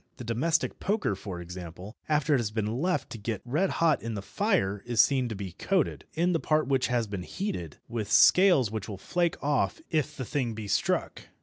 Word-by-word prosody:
The 125 - -7
domestic 145 +8 0
poker, 205 - 0
for 95 -2 -6
example, 90 +3 -8
after 150 0 +2
it 135 - +4
has 115 -3 -1
been 105 0 -2 0.2
left 180 +2 0
to 115 - -6
get 105 -1 -4
red 155 +10 +1
hot 165 -3 +2
in 115 -1 -4
the 100 - -5
fire 135 - 0
is 120 -2 -1
seen 130 -3 +4
to 110 - -4
be 95 -2 -6
coated, 185 - -1
in 175 +3 +2
the 165 - +1
part 155 0 +1
which 135 -2 +2
has 120 -2 +1
been 100 -3 -5
heated, 90 - -5
with 115 -3 -4
scales 175 - +6
which 110 -1 -4
will 100 - -5
flake 175 - 0
off 145 - +1
if 150 -2 0
the 130 - -4
thing 120 -3 -2
be 110 -1 -6
struck. - - -1
120 Hz, 210 wpm, -28 LUFS, 105-155 Hz, 0.2 s, scales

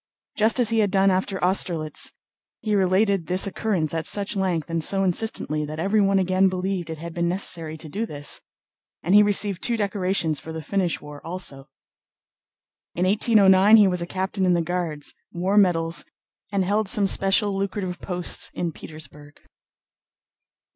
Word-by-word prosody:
Just 220 +4 +2
as 240 -3 +3
he 225 -1 +1
had 205 -2 +2
done 195 0 +3
after 190 +1 -1
Austerlitz, 170 -4 0 0.5
he 215 - -1
related 195 -1 +2
this 185 +1 +1
occurrence 195 -6 -2
at 160 -1 -2
such 205 +1 -1
length 185 -5 -1
and 165 -1 -2
so 195 +4 +3
insistently 180 -5 -1
that 150 +1 -6
everyone 195 +2 +2
again 185 0 +2
believed 185 -2 -3
it 160 - -5
had 170 +2 -8
been 170 0 -1
necessary 170 -4 -2
to 155 - -10
do 210 +9 -3
this, 145 -4 -3 0.6
and 180 - +1
he 210 - +8
received 205 -2 +1
two 235 -1 0
decorations 190 -6 0
for 160 - -9
the 160 - -5
Finnish 185 -1 -1
war 150 -1 -10
also. 150 -6 -5 1.3
In 180 - 0
1809 205 0 +5
he 210 -2 +6
was 180 -2 -1
a 170 - -4
captain 190 +2 -3
in 180 -1 +3
the 170 - 0
Guards, 165 -4 -3 0.2
wore 185 +3 -1
medals, 170 -4 +3 0.5
and 195 -2 0
held 205 +2 0
some 205 0 +3
special 195 +1 +2
lucrative 195 -2 -3
posts 180 -2 -2
in 170 -1 -2
Petersburg. 150 -2 -11
185 Hz, 165 wpm, -23 LUFS, 165-200 Hz, 1.3 s, he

